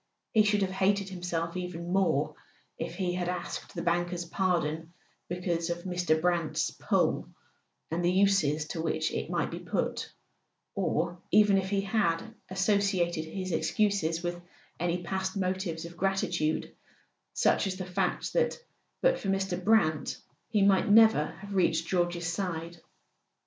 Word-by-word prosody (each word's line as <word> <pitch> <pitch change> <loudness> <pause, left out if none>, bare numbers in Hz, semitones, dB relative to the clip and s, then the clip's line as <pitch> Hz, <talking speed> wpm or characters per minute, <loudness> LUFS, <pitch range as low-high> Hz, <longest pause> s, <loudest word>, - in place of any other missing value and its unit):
He 220 - +5
should 210 -1 +3
have 190 - -1
hated 195 +1 +1
himself 175 -2 -3
even 180 -1 -4
more 155 -6 +2 0.5
if - - -4
he 180 -1 -1
had 180 -1 -1
asked 180 -1 -5
the - - -3
banker's 175 0 0
pardon 165 -3 -1 0.4
be¬ 180 +1 -5
cause 170 -1 0
of 170 0 -3
Mr. 175 -4 +1
Brant's 170 -1 0
"pull," - - 0 0.6
and 170 +2 -1
the 175 - +3
uses 180 -6 +3
to 165 - -3
which 160 -1 0
it - - -3
might - - -1
be - - -5
put; - - -2 0.6
or 175 +1 -1
even 210 -1 +5
if 190 0 -3
he 200 -1 +1
had 200 0 0 0.2
associated 190 -4 +1
his 185 +3 -5
excuses 170 -2 +1
with 175 0 -3 0.4
any 175 +1 -1
past 190 +2 -2
motives 185 -3 -2
of 170 0 -10
gratitude, 195 -5 0 0.6
such - - +3
as 190 - -2
the 185 -1 -5
fact 180 0 -1
that 485 -1 +2 0.5
but - - +4
for - - -5
Mr. 195 -2 -1
Brant 180 -8 +2 0.3
he 210 -3 +3
might 195 0 +4
never 220 -7 +6
have 190 +5 -9
reached 165 -4 +2
George's 175 -1 0
side. 170 -1 -3
180 Hz, 150 wpm, -29 LUFS, 170-195 Hz, 0.6 s, never